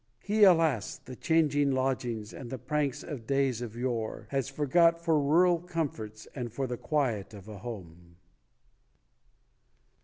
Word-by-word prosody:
He 210 +1 +3
alas, 160 - +3
the 130 - -11
changing 145 -2 +2
lodgings, 125 -5 -2
And 120 - -8
the 130 - -4
pranks 140 +2 -2
of 130 -8 -7
days 135 -4 +1
of 115 -2 -6
yore 120 -3 -3
Has 135 -1 -1
forgot 165 +4 +3
for 160 -3 +3
rural 170 +4 +4
comforts 145 -11 -4
And 120 -4 -5
for 135 +4 -2
the 125 -1 -3
quiet 120 -7 -1
of 100 0 -12
a 105 -2 -8
home. 90 -6 -9
130 Hz, 145 wpm, -29 LUFS, 115-150 Hz, -, rural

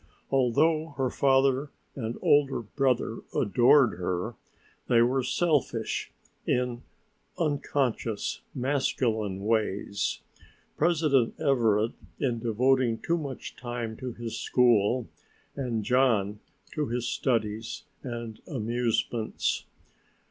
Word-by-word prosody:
Although 145 +4 +2
her 130 -2 0
father 135 +1 +3 0.3
and 115 -3 -4
older 145 -3 +3
brother 125 -1 0 0.2
adored 120 0 +4
her, 90 +5 -2 0.5
they 115 -1 +5
were 130 +3 +2
selfish 130 -5 0 0.4
in 125 -1 0 0.6
unconscious 140 -7 -1
masculine 115 -7 0
ways, 105 -2 0 0.5
President 150 -7 +2
Everett 115 -7 +2 0.3
in 120 -4 0
devoting 120 +1 +2
too 170 - 0
much 140 -4 -6
time 120 -2 -4
to 130 -1 -5
his 115 -1 -5
school 120 -1 +3 0.5
and 120 -5 -2
John 110 -4 +2 0.3
to 150 -2 -1
his 120 +1 -2
studies 110 -3 -1 0.2
and 120 -3 -6
amusements. 120 -2 -1
120 Hz, 95 wpm, -28 LUFS, 110-135 Hz, 0.6 s, they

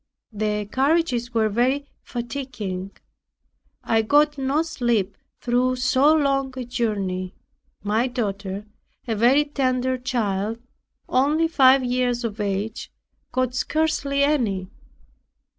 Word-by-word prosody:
The 210 0 -1
carriages 260 0 +1
were 225 -2 +2
very 255 +6 +1 0.2
fatiguing; 235 -7 -5 0.9
I 225 0 +2
got 295 +6 +3
no 275 +3 0
sleep 235 - -1 0.2
through 250 +1 +1
so 260 +3 +3
long 275 -3 +1
a 255 - -4
journey. 200 -7 -2 0.5
My 220 +4 +1
daughter, 200 -5 -3 0.4
a 230 - 0
very 255 +7 +4
tender 260 -3 0
child, 225 -4 -1 0.5
only 295 +5 +2
five 270 -4 +5
years 245 -1 0
of 220 -2 -4
age, 205 +2 -3 0.4
got 255 -1 0
scarcely 280 0 0
any. 215 -11 0
245 Hz, 110 wpm, -23 LUFS, 215-275 Hz, 0.9 s, five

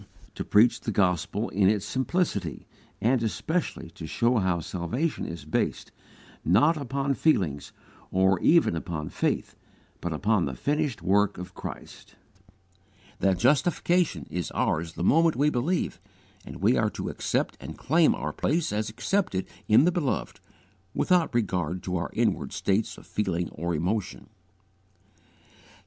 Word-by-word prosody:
To - - -4
preach 115 +3 +4
the 110 - -3
gospel 95 +2 0
in 95 -1 +3
its 105 -2 0
simplicity, 130 - -1 0.4
and 120 +2 +2
especially 115 - -2
to 80 -1 -8
show 120 +9 +1
how 95 -3 +1
salvation 95 - -2
is 85 0 -7
based, - - -2 0.5
not 120 - +4
upon 140 -1 -1
feelings 90 - +1 0.4
or 95 0 +3
even 165 - +4
upon 80 -2 -4
faith, - - -1 0.5
but 85 - -3
upon 100 +4 +1
the 65 - -4
finished 145 - -1
work 100 +2 +2
of 90 +1 -8
Christ; - - -9 1.0
that 95 -2 +2
justification 150 - +2
is 90 -1 -3
ours 80 +1 0
the 85 - -4
moment 165 - +4
we 150 +2 +2
believe, 150 +9 -1 0.5
and - - -8
we - - +5
are - - +2
to - - -5
accept - - -1
and - - -8
claim 160 +2 +3
our - - -4
place 160 -6 0
as 105 0 -1
accepted 110 - -1 0.2
in 110 +7 +6
the 180 - +4
Beloved 170 -7 -2 0.6
without 180 -3 +2
regard 90 -6 -1
to 90 - -3
our 85 - -3
inward - - 0
states 100 +3 0
of - - -14
feeling 90 -5 -2
or 85 +2 -3
emotion. 90 +5 -2
105 Hz, 140 wpm, -27 LUFS, 90-145 Hz, 1.0 s, in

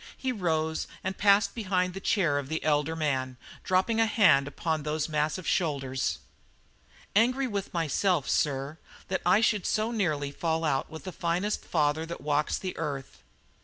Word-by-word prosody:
He 260 - -1
rose 160 -7 -1 0.2
and 185 +1 -2
passed 200 0 +4
behind 185 -5 0
the 195 - -5
chair 170 -8 +1
of 140 -1 -7
the 160 0 -2
elder 150 +1 +1
man, 130 -5 -1 0.3
dropping 190 +5 +1
a 225 - +4
hand 175 -11 +4
upon 160 +1 -2
those 150 +1 -1
massive 155 +2 -1
shoulders. 135 -6 0 1.0
"Angry 250 +5 +3
with 205 -5 -3
myself, 170 -1 +1
sir, 140 +2 0 0.3
that 190 - -1
I 190 +4 +5
should 210 -4 +2
so 215 +2 0
nearly 155 -11 -1
fall 165 +2 -1
out 135 -4 0
with 160 - -9
the 185 - -5
finest 175 +5 -1
father 150 -1 +1
that 170 - -7
walks 150 0 0
the 185 -1 -5
earth." 140 - -5
165 Hz, 165 wpm, -28 LUFS, 150-195 Hz, 1.0 s, I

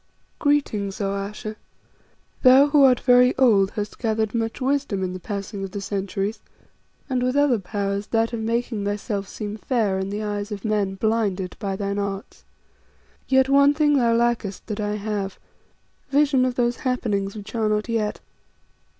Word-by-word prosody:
"Greetings, 220 -10 0
O 195 -1 -1
Ayesha. 210 +2 -5 0.8
Thou 265 +2 +7
who 290 0 +4
art 255 -2 +5
very 250 0 +5
old, 210 -7 +4
hast 210 -2 -5
gathered 220 -2 0
much 225 -1 -2
wisdom 265 -7 0
in 180 -1 -2
the 185 - -6
passing 200 +1 -5
of 195 - -4
the 200 - -5
centuries, 200 +2 -3 0.7
and 255 -2 -1
with 255 +1 0
other 285 -5 +3
powers, 200 +1 -3
that 225 +1 0
of 230 - -2
making 230 -1 -1
thyself 205 0 -3
seem 210 0 -6
fair 215 -5 0
in 190 0 -3
the 205 +2 -3
eyes 205 0 -3
of 205 0 -6
men 205 -3 0
blinded 200 -3 -1
by 195 -1 -2
thine 200 0 -2
arts. 200 0 -5 0.8
Yet 265 0 +4
one 280 +1 +5
thing 295 -1 +3
thou 235 -4 +3
lackest 230 -4 0
that 215 -1 -5
I 210 0 -1
have 205 -2 -3 0.7
vision 280 -2 +3
of 255 -1 -1
those 240 -1 +1
happenings 210 -7 -1
which 210 0 -9
are 220 -2 0
not 210 +1 0
yet. 220 -3 -1
215 Hz, 165 wpm, -23 LUFS, 200-245 Hz, 0.8 s, Thou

